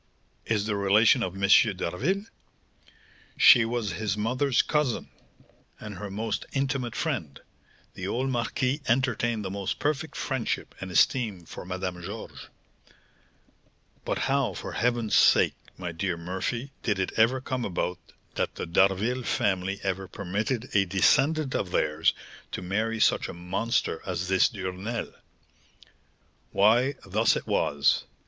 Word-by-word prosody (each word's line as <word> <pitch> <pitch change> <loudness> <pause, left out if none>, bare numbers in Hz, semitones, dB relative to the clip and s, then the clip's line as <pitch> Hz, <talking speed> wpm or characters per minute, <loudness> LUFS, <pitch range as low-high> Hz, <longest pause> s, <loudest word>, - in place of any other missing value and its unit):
"Is 105 -3 +1
the 105 -1 -1
relation 105 +5 +4
of 95 -4 -2
M. 100 0 0 0.3
d'Harville?" 145 - -1 1.1
"She 120 -4 +8
was 115 -3 -2
his 100 +3 -2
mother's 125 +4 +1
cousin, 150 -6 -1 0.7
and 105 -3 -8
her 105 - -5
most 110 +2 -3
intimate 135 -3 -1
friend; 115 - -3 0.5
the 95 - -5
old 130 +6 -1
marquis 125 +3 -1
entertained 120 -3 +1
the 95 - -3
most 100 -1 -3
perfect 150 +1 -2
friendship 130 -4 -2
and 95 - -5
esteem 100 -1 +2
for - - -9
Madame 90 -1 -4
Georges." 100 +5 -8 1.6
"But - - -2
how, 135 -6 +1
for - - -6
heaven's 120 -3 0
sake, - - +5 0.2
my 90 -2 -4
dear 85 +1 -2
Murphy, 95 +10 -4
did 105 -4 0
it 95 -1 -1
ever 115 +4 +3
come 130 -1 -3
about 90 -2 -2 0.3
that - - -2
the - - -4
D'Harville 100 +8 +2
family 95 -4 -1
ever 95 0 -2
permitted 105 +7 -3
a 100 - +5
descendant 135 - +2
of 95 - -1
theirs 80 -2 +1 0.4
to - - -4
marry 110 +5 -1
such - - +2
a - - -7
monster 90 +2 -1
as 90 -1 -3
this 95 -1 +4
Duresnel?" 95 +3 -5 1.4
"Why, 120 +7 +4
thus 110 +4 +2
it - - -4
was. 70 0 +1
105 Hz, 135 wpm, -27 LUFS, 95-125 Hz, 1.6 s, She